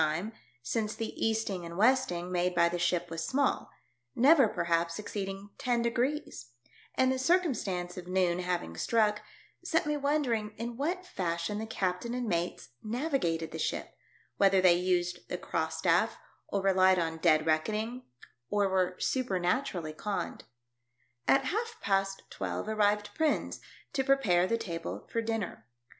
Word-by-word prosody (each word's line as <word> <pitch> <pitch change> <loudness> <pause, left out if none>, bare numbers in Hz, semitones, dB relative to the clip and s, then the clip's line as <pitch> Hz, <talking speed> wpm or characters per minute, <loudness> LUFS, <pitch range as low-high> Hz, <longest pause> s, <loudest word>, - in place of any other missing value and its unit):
e, 205 +6 -5 0.3
since 215 - -1
the 225 -1 -4
easting 220 -5 0
and 170 0 -7
westing 215 -6 +2
made 180 0 +1
by 170 0 +5
the 175 +1 -2
ship 175 0 0
was 165 0 -3
small, 275 +1 0 0.5
never, 275 0 +6
perhaps, 170 -2 0
exceeding 200 -1 -5
ten 240 -2 +1
degrees; 245 - -2 0.4
and 260 0 +3
the 260 - -1
circumstance 255 - 0
of 180 -1 -7
noon 180 -1 +1
having 175 - -2
struck 210 - +2 0.4
set 330 -2 +1
me 300 0 0
wondering 270 -7 0
in 235 +2 -4
what 345 +8 -2
fashion 175 - -2
the 220 - -4
captain 195 +3 -2
and 250 -2 -2
mates 175 -6 -2
navigated 215 - -1
the - - -6
ship, - - -2 0.4
whether 195 -1 +5
they 185 -1 +6
used 175 0 0
the 180 - -2
cross 160 -2 -2
staff 170 +6 +2 0.3
or 200 -1 -1
relied 190 -1 +5
on 165 -2 -1
dead 155 -2 +3
reckon 155 +6 +1
ing, 235 +4 -3 0.5
or 205 -1 +2
were 185 -1 +1
supernaturally 185 - -1
conned. 200 +6 -4 0.8
At 270 0 +4
half 450 - -2
past 195 0 0
twelve - - -4
arrived 210 -1 +1
Prins, 315 -1 0 0.3
to 265 - +1
pre 275 +1 +5
pare 180 -8 +3
the 230 - +1
table 165 - -5
for 230 - 0
dinner. 225 - -3
200 Hz, 150 wpm, -30 LUFS, 175-245 Hz, 0.8 s, never